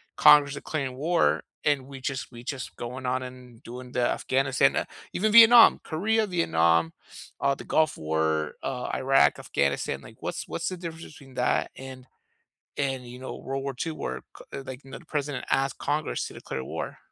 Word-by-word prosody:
Congress 145 -1 +6
declaring 140 -3 -4
war 165 +4 +1 0.2
and 140 -3 +1
we 135 -1 -10
just 135 0 -4
we 120 0 -11
just 135 0 -6
going 125 +2 -6
on 130 +1 0
and 125 -2 -11
doing 125 +1 -9
the 125 - -1
Afghanistan 135 0 +1
ah, - - 0 0.3
even 215 +3 +1
Vietnam, 230 +1 +9
Korea, 220 +7 +1
Vietnam, 85 - +2 0.5
uh, 140 +1 +2
the - - -8
Gulf 155 -1 +1
War, 80 -1 0
uh, 125 -2 -3
Iraq, 135 +1 +4
Afghanistan. 70 0 -1
Like, - - -13
what's - - -4
what's - - -3
the 185 - -6
difference 165 -1 -7
between 135 -3 -14
that 125 0 +1
and 130 -1 -10 0.7
and, 135 -3 -2
you 125 +1 -10
know, 130 - -7
World 135 0 -4
War 140 -2 -3
II 165 - -3
where 65 - -5 0.3
c - - -5
like, 130 0 -9
no 135 - -9
the 175 - -18
president 145 -4 -3
asked 135 0 +1
Congress 150 +2 -2
to - - -13
declare 65 - -6
war? - - -5
135 Hz, 180 wpm, -26 LUFS, 125-150 Hz, 0.7 s, Vietnam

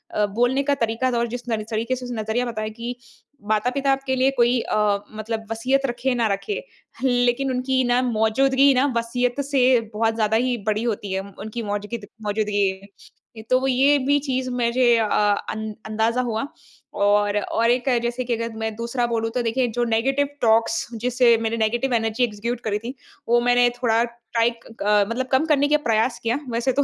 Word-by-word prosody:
अ, 210 - +3
बोलने 245 +6 +1
का 285 0 +1
तरीका 230 0 0
था 240 - 0
और 235 0 +1
जिस 245 +1 -5
तरी 220 -2 -1
तरीके 230 +4 -1
से 250 0 -7
उसने 240 -3 -4
नज़रिया 220 +3 -1
बताया 215 -2 -4
कि 235 +3 -6 0.5
माता-पिता 250 +6 +1
आपके 270 -1 0
लिए 260 +1 +3
कोई 240 +1 +3
अ, - - -2 0.4
मतलब 220 +1 -4
वसीयत 260 +5 +1
रखे 250 +1 -1
ना 235 -2 +1
रखे। 415 - -4 0.4
लेकिन 245 +1 +2
उनकी 260 +1 0
ना 245 +1 +3
मौजूदगी 265 +4 +3
ना 260 +1 +3
वसीयत 245 +3 -1
से 260 -3 +3
बहुत 225 +1 0
ज़्यादा 220 -1 +2
ही 250 -1 0
बड़ी 215 +1 +1
होती 210 -4 -3
है। 190 - -1 0.2
उनकी 220 +2 -5
मौजगिद 205 +1 -4 0.2
मौजूदगी। 205 -2 -1 0.6
तो 255 - +4
वो 265 - -1
ये 270 +3 +4
भी 280 +2 +2
चीज़ 260 -2 -2
मुझे 240 0 +2
अ, 225 - +2
अं 210 +1 0
अंदाज़ा 220 +3 0
हुआ 235 +1 -2 0.5
और 205 0 +2
और 230 +3 0
एक 250 +2 0
जैसे 240 +1 -2
कि 240 -1 0
अगर 230 0 -4
मैं 220 0 -3
दूसरा 235 +2 -2
बोलूँ 225 -1 -1
तो 250 - +1
देखिए 245 +2 0
जो 240 - +2
नेगेटिव 265 +5 +1
टॉक्स 230 +9 +2
जिसे 245 -1 +4
मैंने 225 0 -1
नेगेटिव 240 +4 0
एनर्जी 225 +1 +1
एग्ज़ीक्युट 230 +1 -2
करी 205 -2 0
थी, 235 +4 -6 0.4
वो 240 0 +4
मैंने 245 0 +4
थोड़ा 230 -1 +3
टाइट 235 -1 -2 0.2
अ, 205 0 +3
मतलब 250 +3 -2
कम 265 +4 +3
करने 290 -3 +3
के 300 +1 +4
प्रयास 225 +2 +1
किया। 235 +4 0
वैसे 235 +2 0
तो - - +5
235 Hz, 190 wpm, -22 LUFS, 220-255 Hz, 0.6 s, तो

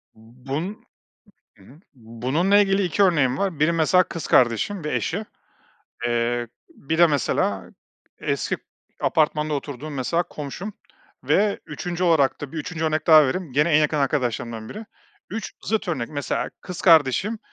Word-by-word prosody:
B 120 +4 -20
bun 175 +10 -4 0.7
hı 95 - -19
hı. 140 +9 -17
Bununla 130 - +1
ilgili 200 -1 +3
iki 185 +3 +1
örneğim 145 -9 +3
var. 190 -7 -2
Biri 155 +2 +4
mesela 165 +3 +4
kız 170 - -6
kardeşim 130 - +2
ve 150 - -2
eşi, 200 +6 -2 0.8
eee, 120 0 0 0.2
bir 160 +4 -4
de 170 - +8
mesela 110 -9 -1 0.5
eski - - -1
k - - -29 0.4
apartmanda 155 -1 +1
oturduğum 145 +1 -6
mesela 165 +7 0
komşum 170 +8 -7 0.5
ve 205 0 +2
3'üncü 175 0 -4
olarak 155 -6 +3
da 145 -1 -7
bir 165 - -4
3'üncü 165 +1 -4
örnek 155 0 0
daha 155 -3 +8
vereyim. 165 +1 -3
Gene 150 +5 +2
en 150 - +5
yakın 150 0 +1
arkadaşlarımdan 120 -5 -1
biri. 215 +1 -8 0.4
3 220 +1 -5
zıt 215 -3 -1
örnek. 130 -9 -2
Mesela 145 -2 -3
kız 180 -2 -7
kardeşim 170 - +4
155 Hz, 155 wpm, -23 LUFS, 130-180 Hz, 0.8 s, de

